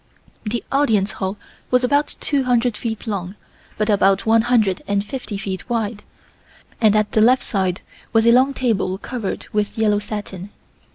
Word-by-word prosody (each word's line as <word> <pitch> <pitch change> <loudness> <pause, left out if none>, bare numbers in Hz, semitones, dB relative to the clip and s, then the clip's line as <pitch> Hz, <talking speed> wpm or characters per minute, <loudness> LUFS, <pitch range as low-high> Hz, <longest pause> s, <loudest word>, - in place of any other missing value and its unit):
The 225 +2 -2
Audience 220 -8 +2
Hall 190 +1 -4 0.3
was 250 0 +3
about 285 +4 +1
two 280 -3 0
hundred 245 -2 +2
feet 220 -1 -4
long 195 -3 -4 0.4
by 215 - +1
about 195 -1 +3
one 225 0 +5
hundred 220 -6 +2
and 200 0 0
fifty 245 -4 -5
feet 195 +1 -5
wide, 220 -3 -2 0.8
and 215 -2 +5
at 215 0 +1
the 215 - +3
left 250 +4 +5
side 190 -3 -1 0.3
was 225 0 +3
a 235 - +7
long 260 +3 +4
table 200 -7 0
covered 225 -1 -5
with 210 0 -1
yellow 210 -2 +2
satin. 205 -2 -6
215 Hz, 165 wpm, -20 LUFS, 200-240 Hz, 0.8 s, a